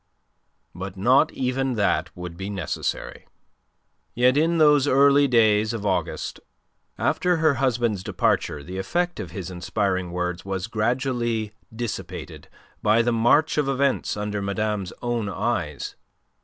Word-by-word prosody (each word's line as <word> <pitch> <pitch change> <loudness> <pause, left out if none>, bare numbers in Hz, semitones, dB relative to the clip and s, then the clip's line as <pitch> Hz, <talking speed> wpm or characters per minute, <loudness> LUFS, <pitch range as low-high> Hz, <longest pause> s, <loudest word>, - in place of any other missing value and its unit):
But 95 +2 -7
not 130 +10 +4
even 130 +1 -1
that 100 -2 +1
would 90 -1 -7
be 95 +3 -5
necessary. 95 -5 -4 0.9
Yet 125 +2 +4
in 165 +3 +2
those 150 -3 +5
early 140 +1 +5
days 110 -3 +3
of 110 -3 -4
August, 95 -3 -2 0.6
after 180 0 +1
her 155 -2 +3
husband's 120 -6 0
departure 75 -4 0
the 90 +4 -6
effect 175 - -1
of - - -5
his 95 -3 -6
inspiring 95 0 -1
words 90 0 -3
was 95 -1 -3
gradually 120 -1 -1 0.2
dissipated 115 0 -6 0.3
by 110 +2 +4
the 120 0 +1
march 120 +8 +3
of 140 -2 +1
events 135 -4 0
under 105 0 -3
madame's 100 -1 -2
own 120 -4 -1
eyes. 100 - -2
110 Hz, 130 wpm, -24 LUFS, 95-130 Hz, 0.9 s, those